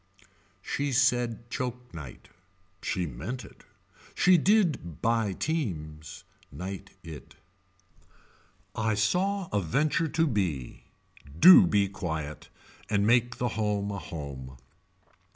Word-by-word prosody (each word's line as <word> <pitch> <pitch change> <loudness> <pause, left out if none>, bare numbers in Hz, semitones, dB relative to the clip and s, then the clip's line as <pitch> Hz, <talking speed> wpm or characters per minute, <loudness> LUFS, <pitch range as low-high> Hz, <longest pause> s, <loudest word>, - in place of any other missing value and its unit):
She 145 0 -2
said 125 -3 +1
choke 125 -3 -4
night. 70 -7 -10 0.5
She 90 - -1
meant 85 - -6
it. - - -17 0.5
She 185 0 +5
did 165 - +2
buy 115 -3 +1
teams. 80 - -4 0.3
Night 95 +6 -7
it. 80 -4 -10 1.4
I 110 -1 0
saw 185 - +1
a 100 - +2
venture 150 - +1
to 165 +2 +1
be 90 - -2 0.5
do 185 - +9
be 100 -1 +2
quiet 80 -6 -5 0.4
and 100 -1 +2
make 120 +2 +3
the 125 - 0
home 105 -2 -1
a 100 - -4
home. 70 -6 -8
105 Hz, 110 wpm, -28 LUFS, 80-130 Hz, 1.4 s, do